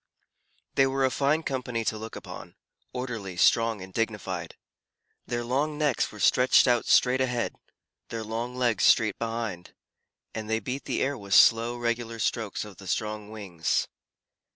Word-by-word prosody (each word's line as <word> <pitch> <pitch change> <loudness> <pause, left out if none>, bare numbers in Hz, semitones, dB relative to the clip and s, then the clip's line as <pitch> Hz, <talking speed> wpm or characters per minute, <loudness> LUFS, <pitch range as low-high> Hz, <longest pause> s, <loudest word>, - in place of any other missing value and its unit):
They 135 - +4
were 135 0 +1
a 130 - +1
fine 145 +4 +1
company 125 -5 -3
to 110 - 0
look 110 0 -8
upon, - - -9 0.4
orderly, 115 -8 -5
strong, 115 +3 +3
and 95 0 -12
dignified. 95 -6 -3 0.7
Their 120 -1 -2
long 140 +5 -1
necks 150 -4 +1
were - - -11
stretched 130 +2 +5
out 120 -1 +2
straight 130 +1 +4
ahead, 125 -2 -1 0.6
their 115 -1 -4
long 115 +3 -4
legs 120 -5 +1
straight 110 -3 +4
behind, 115 -6 -4 0.6
and 110 -1 -5
they 110 0 +1
beat 125 +6 -5
the - - -1
air 135 -1 -2
with 100 -1 -1
slow, 115 +1 +5
regular 115 -1 -2
strokes 110 -1 -2
of 100 -3 -12
the 95 - -11
strong 105 +3 -3
wings. 95 -7 -2
115 Hz, 155 wpm, -27 LUFS, 105-125 Hz, 0.7 s, stretched